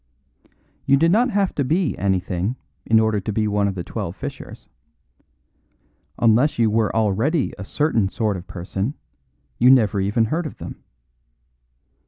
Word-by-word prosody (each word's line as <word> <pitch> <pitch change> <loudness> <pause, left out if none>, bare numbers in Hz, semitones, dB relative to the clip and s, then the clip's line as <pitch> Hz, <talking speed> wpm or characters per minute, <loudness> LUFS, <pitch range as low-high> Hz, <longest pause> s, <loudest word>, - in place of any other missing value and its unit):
You 140 - +5
did 165 +4 +3
not 240 +6 +3
have 200 -4 0
to 140 - -1
be 160 +4 0
anything 95 +2 -1 0.3
in 110 0 +5
order 110 -1 +1
to 100 - -4
be 110 +1 0
one 105 -1 +1
of 100 - -3
the 90 - -4
Twelve - - -5
Fishers; - - -8 1.5
unless 120 +6 +3
you 115 -2 +2
were 110 -1 +1
already 115 - +1
a - - -5
certain 115 -3 0
sort 105 0 -1
of 90 +1 -8
person, 95 - -4 0.6
you 125 - +6
never 110 -6 +4
even 105 +4 +1
heard 160 +8 -2
of - - -10
them. - - -9
110 Hz, 155 wpm, -21 LUFS, 100-140 Hz, 1.5 s, you